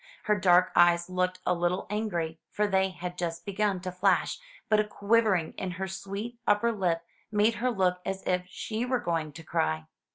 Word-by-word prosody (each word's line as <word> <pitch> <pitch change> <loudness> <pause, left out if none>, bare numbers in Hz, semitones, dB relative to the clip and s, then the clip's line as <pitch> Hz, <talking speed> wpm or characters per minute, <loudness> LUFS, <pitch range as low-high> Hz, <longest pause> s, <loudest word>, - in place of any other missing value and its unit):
Her 210 - +2
dark 185 -2 +4
eyes 175 +1 +4
looked 185 0 0
a 180 - +3
httle 175 +1 0
angry, 170 -7 -2
for 210 - 0
they 190 -1 +2
had 180 -1 -7
just 170 -1 -3
begun 200 -2 0
to 185 0 -4
flash; 180 - +1 0.3
but 215 - +4
a - - +4
quivering 210 -4 +1
in 185 - -2
her 190 0 -2
sweet 200 +5 -6
upper 210 +3 +3
lip 175 -6 -1 0.3
made 210 +2 +3
her 255 - +2
look 185 -5 +1
as 195 0 -4
if 180 0 0
she 220 +5 -4
were 250 +1 +1
going 165 -5 -2
to 165 - -10
cry. 80 - -1
185 Hz, 190 wpm, -28 LUFS, 175-210 Hz, 0.3 s, dark